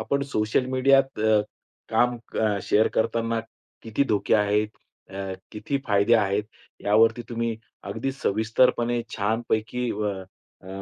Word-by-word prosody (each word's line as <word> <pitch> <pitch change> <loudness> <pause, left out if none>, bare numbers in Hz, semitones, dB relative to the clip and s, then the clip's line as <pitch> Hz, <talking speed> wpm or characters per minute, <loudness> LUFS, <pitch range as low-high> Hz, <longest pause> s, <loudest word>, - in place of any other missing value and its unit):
आपण 140 0 -1
सोशल 110 +4 +1
मीडियात 135 -1 +3
अ, 110 -1 +4 0.5
काम 120 0 +2 0.2
क 105 -2 +1
शेअर 110 +2 +3
करताना 115 0 0 0.4
किती 115 +5 0
धोके 105 -2 +1
आहेत? 105 0 +2 0.4
अ, 95 0 -5 0.2
किती 115 +6 -2
फायदे 100 +2 +4
आहेत? 105 -1 +1 0.3
यावरती 115 +3 +3
तुम्ही 115 -1 -2 0.3
अगदी 135 - -3
सविस्तरपणे 120 +1 +1
छानपैकी 115 +3 -1
व 105 -1 -1 0.5
अ, - - -15
110 Hz, 120 wpm, -25 LUFS, 105-120 Hz, 0.5 s, अ